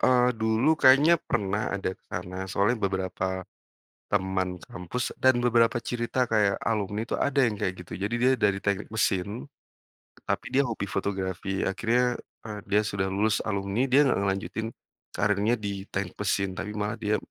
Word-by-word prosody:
eee, 125 Hz, -1 st, +4 dB
dulu 110 Hz, +7 st, +3 dB
kayaknya 145 Hz, +6 st, +6 dB
pernah 105 Hz, -2 st, -1 dB
ada 95 Hz, -2 st, -2 dB
ke -, -, -16 dB
sana 90 Hz, +2 st, -5 dB
soalnya 105 Hz, +5 st, +1 dB
beberapa 95 Hz, -1 st, -2 dB, 0.7 s
teman 95 Hz, -2 st, 0 dB
sekampus 95 Hz, +7 st, -5 dB
dan 130 Hz, -2 st, +4 dB
beberapa 120 Hz, -1 st, +3 dB
cerita 120 Hz, +1 st, -1 dB
kayak 105 Hz, -3 st, +2 dB
alumni 105 Hz, +1 st, -1 dB
itu -, -, -1 dB
ada 140 Hz, 0 st, +1 dB
yang 115 Hz, -5 st, +2 dB
kayak 95 Hz, -, -1 dB
gitu. 90 Hz, -, -10 dB
Jadi 100 Hz, +5 st, -2 dB
dia 130 Hz, +1 st, +5 dB
dari 100 Hz, -3 st, +1 dB
teknik 100 Hz, +2 st, -2 dB
mesin, 105 Hz, +3 st, -1 dB, 0.8 s
tapi -, -, -1 dB
dia 135 Hz, 0 st, +3 dB
hobi 110 Hz, -4 st, -3 dB
fotografi. 95 Hz, -1 st, -2 dB
Akhirnya, 120 Hz, +5 st, +1 dB, 0.2 s
eee, 105 Hz, -2 st, -6 dB
dia 105 Hz, +1 st, +3 dB
sudah 100 Hz, -2 st, -1 dB
lulus 100 Hz, +3 st, +1 dB
alumni, 100 Hz, +5 st, 0 dB
dia 135 Hz, +3 st, +5 dB
nggak 130 Hz, -7 st, +2 dB
ngelanjutin 100 Hz, +3 st, -2 dB, 0.5 s
karirnya 105 Hz, +3 st, +2 dB
di 100 Hz, -2 st, -5 dB
teknik 95 Hz, -1 st, -4 dB
mesin. 100 Hz, -1 st, 0 dB
Tapi 100 Hz, +3 st, -4 dB
malah 105 Hz, +1 st, -2 dB
dia 105 Hz, -1 st, +1 dB
105 Hz, 160 wpm, -27 LUFS, 95-120 Hz, 0.8 s, kayaknya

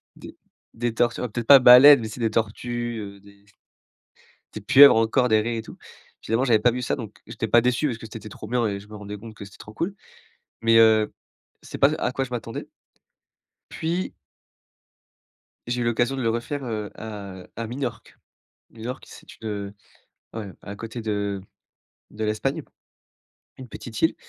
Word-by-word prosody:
des -, -, -12 dB, 0.4 s
des 120 Hz, 0 st, -2 dB
tortues, 120 Hz, 0 st, 0 dB
alors 125 Hz, -3 st, -4 dB
peut-être 115 Hz, +1 st, -4 dB
pas 140 Hz, -1 st, +10 dB
baleines, 125 Hz, +3 st, +9 dB
mais 110 Hz, -, -4 dB
tu 110 Hz, -, -8 dB
sais -, -, -10 dB
des 110 Hz, -1 st, +1 dB
tortues, 120 Hz, +2 st, -2 dB
heu, 100 Hz, -1 st, -8 dB
des 100 Hz, 0 st, -20 dB, 1.1 s
des 110 Hz, -, -7 dB
pieuvres 135 Hz, +6 st, +8 dB
encore, 120 Hz, +3 st, +2 dB
des 110 Hz, -1 st, +4 dB
raies 115 Hz, +1 st, -2 dB
et -, -, -4 dB
tout. -, -, -13 dB, 0.4 s
Finalement, 115 Hz, +4 st, 0 dB
j'avais 115 Hz, -4 st, +4 dB
pas 120 Hz, +3 st, +3 dB
vu 125 Hz, +1 st, -4 dB
ça, -, -, -1 dB
donc 110 Hz, -5 st, -9 dB
j'étais 115 Hz, 0 st, -4 dB
pas 120 Hz, -, +5 dB
déçu 125 Hz, +4 st, +1 dB
parce 115 Hz, -3 st, -4 dB
que 110 Hz, -, -9 dB
c'était 110 Hz, -1 st, -8 dB
trop 105 Hz, -, -10 dB
bien 120 Hz, -1 st, +1 dB
et 100 Hz, -1 st, -3 dB
je 105 Hz, -, -16 dB
me 105 Hz, -, -11 dB
rendais 105 Hz, 0 st, -7 dB
compte 110 Hz, +1 st, -11 dB
que 100 Hz, -, -10 dB
c'était 100 Hz, -, -14 dB
trop 105 Hz, -, -12 dB
cool 185 Hz, -, -3 dB, 0.7 s
mais 115 Hz, 0 st, +4 dB
heu, 110 Hz, -1 st, +5 dB, 0.5 s
c'est -, -, -8 dB
pas 140 Hz, +3 st, +4 dB
à 125 Hz, -, -2 dB
quoi 135 Hz, +1 st, -2 dB
je 125 Hz, -, -14 dB
m'attendais 115 Hz, -1 st, -6 dB, 1.0 s
puis 170 Hz, +3 st, -3 dB, 1.5 s
j'ai 120 Hz, 0 st, -2 dB
eu -, -, -1 dB
l'occasion 120 Hz, +3 st, 0 dB
de 130 Hz, -, -3 dB
le 115 Hz, -, +1 dB
refaire, 125 Hz, +4 st, -3 dB
heu, 105 Hz, -3 st, -4 dB
à 100 Hz, -4 st, -8 dB
à 115 Hz, 0 st, -4 dB
Minorque. 120 Hz, -2 st, -6 dB, 0.5 s
Minorque, 120 Hz, +3 st, -7 dB
c'est -, -, -14 dB
une, 110 Hz, -, -5 dB
heu, 100 Hz, -1 st, -5 dB, 0.6 s
ouais, 105 Hz, -4 st, -6 dB
à 100 Hz, -, -8 dB
côté 115 Hz, +2 st, -7 dB
de 100 Hz, -2 st, -2 dB, 0.7 s
de 110 Hz, +1 st, -5 dB
l'Espagne, 135 Hz, +9 st, -1 dB, 1.0 s
une 130 Hz, -2 st, -10 dB
petite 110 Hz, -1 st, -8 dB
île 160 Hz, -, +3 dB
115 Hz, 190 wpm, -24 LUFS, 105-125 Hz, 1.5 s, pas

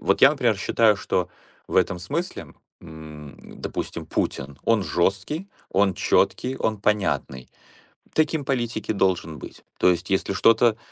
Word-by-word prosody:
Вот 100 Hz, -, +1 dB
я, 135 Hz, -, +10 dB
например, 120 Hz, -7 st, +1 dB
считаю, 105 Hz, +1 st, +3 dB
что 90 Hz, -2 st, -1 dB, 0.4 s
в -, -, -3 dB
этом 90 Hz, -, +2 dB
смысле, 165 Hz, -, -4 dB, 0.3 s
м, 75 Hz, -2 st, -11 dB, 0.2 s
допустим, -, -, -5 dB
Путин: 70 Hz, 0 st, -3 dB
он 115 Hz, -3 st, +3 dB
жесткий, 100 Hz, -, -1 dB, 0.2 s
он 95 Hz, -1 st, +2 dB
четкий, 130 Hz, +1 st, +1 dB
он 110 Hz, -1 st, -1 dB
понятный. 100 Hz, -11 st, -1 dB, 0.7 s
Таким 155 Hz, -2 st, +1 dB
политик 120 Hz, -4 st, -2 dB
и -, -, +2 dB
должен 90 Hz, -5 st, 0 dB
быть. -, -, -11 dB
То -, -, +4 dB
есть, 90 Hz, +1 st, -3 dB
если 95 Hz, 0 st, 0 dB
что-то 115 Hz, +2 st, +4 dB
100 Hz, 145 wpm, -24 LUFS, 85-120 Hz, 0.7 s, я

